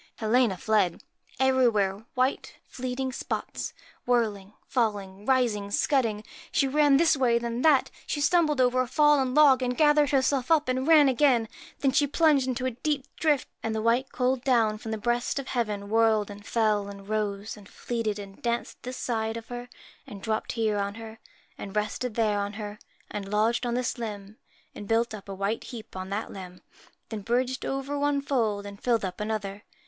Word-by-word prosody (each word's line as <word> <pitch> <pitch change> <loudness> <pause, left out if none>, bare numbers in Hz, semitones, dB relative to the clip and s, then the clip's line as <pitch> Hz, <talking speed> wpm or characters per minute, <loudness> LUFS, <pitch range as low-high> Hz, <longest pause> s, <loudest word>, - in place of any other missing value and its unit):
Helena 225 -2 +2
fled. 200 -4 +1 0.4
Everywhere 230 -6 +2
white 255 +2 0
fleeting 255 +1 -4
spots - - -4 0.3
whirling, 210 -5 0
falling, 205 -4 -2
rising, 235 -6 +1
scudding! 220 -1 +1 0.3
She 275 - +2
ran 290 0 +4
this 320 +1 +4
way, 250 -4 +3
then 235 +1 -3
that; 295 -3 +4 0.2
she 295 - -2
stumbled 300 -1 +3
over 255 0 +3
a 255 - -2
fallen 280 -1 +3
log, 280 -4 +6
she 250 - 0
gathered 295 +3 +3
her 270 -1 +3
self 260 -2 0
up 315 -3 +3
and 260 +2 0
ran 310 -3 +7
again; 255 -3 +3 0.3
then 275 - +3
she 290 +2 +3
plunged 295 -3 +3
into 255 0 -2
a 260 - 0
deep 275 +3 -2
drift; 295 -4 +1
and 225 -1 -2
the 220 - -1
white 240 +4 +1
cold 255 0 0
down 225 -5 +2
from 225 - -7
the 220 - -2
breast 240 +4 -1
of 275 -1 -4
heaven 210 -5 -2
whirled 220 -1 +2
and 205 +1 -11
fell, 215 -3 +1
and 200 -1 -10
rose, 210 -1 -2
and 205 -2 -15
fleeted, 230 -3 -3
and 195 -1 -10
danced 235 0 -2
this 250 +1 -6
side 225 -1 -2
of 230 - -10
her, 245 0 -6 0.4
and 200 -1 -10
dropped 220 -1 -2
here 220 -3 0
on 200 0 -2
her, 225 -1 -9 0.4
and 195 0 -7
rested 210 +3 -2
there 215 -3 +1
on 200 0 -3
her, 210 0 -7 0.3
and 200 -2 -5
lodged 225 +4 +1
on 240 - -1
this 250 0 -2
limb, 210 -2 -6 0.4
and 205 - -9
built 230 +1 +1
up 205 -2 -9
a 195 - -5
white 200 +3 -2
heap 230 -6 -9
on 185 0 -5
that 205 +3 -3
limb, 180 -2 -10 0.5
then 220 -2 -5
bridged 250 +5 -1
over 275 +1 -3
one 290 0 +1
fold 225 -8 -1
and 200 0 -9
filled 230 -4 +1
up 185 - -6
another. 205 -2 -3
230 Hz, 185 wpm, -27 LUFS, 210-260 Hz, 0.5 s, ran